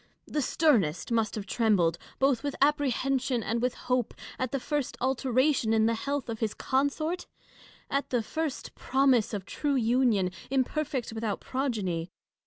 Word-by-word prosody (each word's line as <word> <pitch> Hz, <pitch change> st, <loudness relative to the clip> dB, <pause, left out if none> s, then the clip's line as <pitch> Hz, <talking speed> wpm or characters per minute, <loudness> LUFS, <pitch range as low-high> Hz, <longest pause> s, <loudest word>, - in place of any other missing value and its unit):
The 300 Hz, -, -1 dB
sternest 240 Hz, -, +2 dB
must 225 Hz, -2 st, +1 dB
have 210 Hz, -2 st, -4 dB
trembled, 195 Hz, -7 st, +2 dB, 0.2 s
both 270 Hz, -3 st, +2 dB
with 285 Hz, -1 st, -3 dB
apprehension 270 Hz, -4 st, +1 dB
and 230 Hz, +3 st, -1 dB
with 250 Hz, 0 st, 0 dB
hope, 250 Hz, -2 st, -1 dB, 0.2 s
at 255 Hz, -2 st, -1 dB
the 275 Hz, -, -1 dB
first 290 Hz, 0 st, -2 dB
alteration 260 Hz, -1 st, +2 dB
in 220 Hz, -1 st, +4 dB
the 230 Hz, -, +3 dB
health 280 Hz, +3 st, -2 dB
of 225 Hz, -2 st, -4 dB
his 220 Hz, -3 st, -1 dB
consort; 285 Hz, +6 st, -1 dB, 0.6 s
at 280 Hz, +1 st, -1 dB
the 245 Hz, -3 st, +1 dB
first 315 Hz, +3 st, -4 dB
promise 265 Hz, -4 st, +2 dB
of 200 Hz, -4 st, -4 dB
true 290 Hz, -2 st, -1 dB
union, 230 Hz, -6 st, +2 dB, 0.2 s
imperfect 270 Hz, -1 st, -1 dB
without 220 Hz, -2 st, -2 dB
progeny. 205 Hz, -11 st, -2 dB
250 Hz, 150 wpm, -29 LUFS, 220-275 Hz, 0.6 s, in